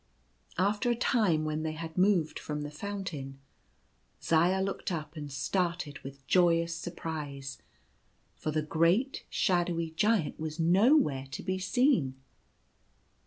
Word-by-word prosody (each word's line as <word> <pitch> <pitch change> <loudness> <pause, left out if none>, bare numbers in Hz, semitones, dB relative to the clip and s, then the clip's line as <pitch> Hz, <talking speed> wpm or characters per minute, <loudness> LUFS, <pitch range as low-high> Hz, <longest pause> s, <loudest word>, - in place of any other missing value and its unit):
After 205 +6 +1
a 240 - +2
time, 210 - +2
when 155 0 -2
they 155 0 -2
had 160 0 -7
moved 180 -4 +2
from 150 -1 -4
the 145 0 -5
fountain, 150 -7 -5 0.8
Zaya 175 +4 +3
looked 190 0 -2
up 155 -2 -4
and 145 -2 -6
started 170 +1 -1
with 135 0 -11
joyous 170 -1 +3
surprise, 150 -6 -6 0.8
for - - -4
the 155 0 0
great 170 - +1
shadowy 175 -3 +1
Giant 210 0 +1
was 155 +1 -5
nowhere 175 - +4
to 130 - -6
be 185 0 -1
seen. 190 - +2
165 Hz, 125 wpm, -30 LUFS, 150-190 Hz, 0.8 s, nowhere